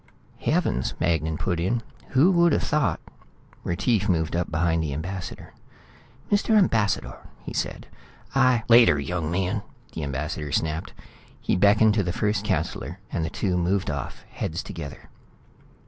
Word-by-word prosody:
"Heavens," 65 - 0
Magnan 80 -1 0
put 90 0 -1
in. 115 +7 0 0.3
"Who 145 +8 +5
would 170 -3 +4
have - - +1
thought 150 -4 +1 0.4
" - - -29
Retief 105 +3 0
moved 80 -2 +1
up 85 0 -1
behind 80 +1 +1
the 75 -3 -2
ambassador. 90 +3 -6 0.8
"Mr. 215 +2 +3
Ambassador," 115 - +1 0.2
he - - -7
said, - - -3 0.5
"I 130 -3 +4
" - - -23
"Later, 115 -12 +6
young 80 +2 -2
man," 95 +4 -1 0.3
the - - -4
ambassador 70 +1 -3
snapped. 80 +2 -1 0.5
He - - 0
beckoned 105 +3 +5
to 105 -2 +1
the 90 - -1
first 105 +4 0
councillor, 80 +9 -2
and 85 - -1
the 80 - -1
two 95 +1 -1
moved 90 0 0
off, 70 - -6
heads 80 +3 -3
together. 70 -5 -8
90 Hz, 150 wpm, -25 LUFS, 80-110 Hz, 0.8 s, Later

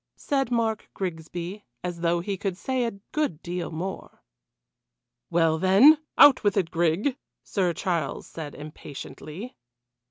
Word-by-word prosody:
said 270 -3 -1
Mark 225 -3 0
Grigsby, 175 +2 -5 0.2
as 175 -1 -4
though 170 0 +1
he 195 +3 -2
could 190 -1 -3
say 255 +3 -1
a 230 - -1 0.2
good 295 - -1
deal 175 0 -3
more. 180 +4 -6 1.1
"Well, 165 -1 +3
then 205 - +7 0.2
out 280 -4 +8
with 205 -1 +2
it, 180 -4 +1
Grig," 175 - +1 0.3
Sir 185 -4 0
Charles 170 -7 -2
said 155 -3 -8
impatiently. 150 - -9
180 Hz, 130 wpm, -26 LUFS, 165-220 Hz, 1.1 s, out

